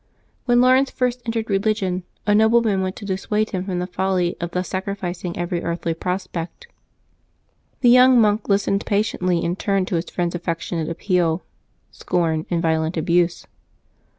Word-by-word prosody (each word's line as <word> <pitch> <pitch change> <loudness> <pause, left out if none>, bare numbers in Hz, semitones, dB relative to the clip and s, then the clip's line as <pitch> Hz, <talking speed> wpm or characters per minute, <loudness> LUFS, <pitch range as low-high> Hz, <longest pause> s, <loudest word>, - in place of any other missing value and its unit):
When 245 -1 +4
Laurence 260 +2 +4
first 250 -1 -1
entered 225 -1 -2
religion, 195 -2 0 0.2
a 205 - +3
nobleman 220 -2 +3
went 185 0 -2
to 205 - -9
dissuade 210 +3 -1
him 185 -1 -3
from 185 -2 -3
the 180 - -1
folly 180 -1 -1
of 170 - -2
thus 180 +1 -3
sacrificing 185 -2 -4
every 175 0 -2
earthly 170 -1 -2
prospect. 180 - -5 1.2
The 245 - +5
young 250 0 +7
monk 210 -1 +2
lis 200 0 +2
tened 200 +1 0
patiently 185 -5 0
in 170 +1 -1
turn 195 -2 0
to 180 - -1
his 165 - -4
friend's 175 -1 -2
affectionate 170 -1 -3
appeal, 175 -1 0 0.5
scorn, 165 -3 -1
and 170 0 -1
violent 160 +1 0
abuse. 170 +2 +1
185 Hz, 155 wpm, -21 LUFS, 175-210 Hz, 1.2 s, young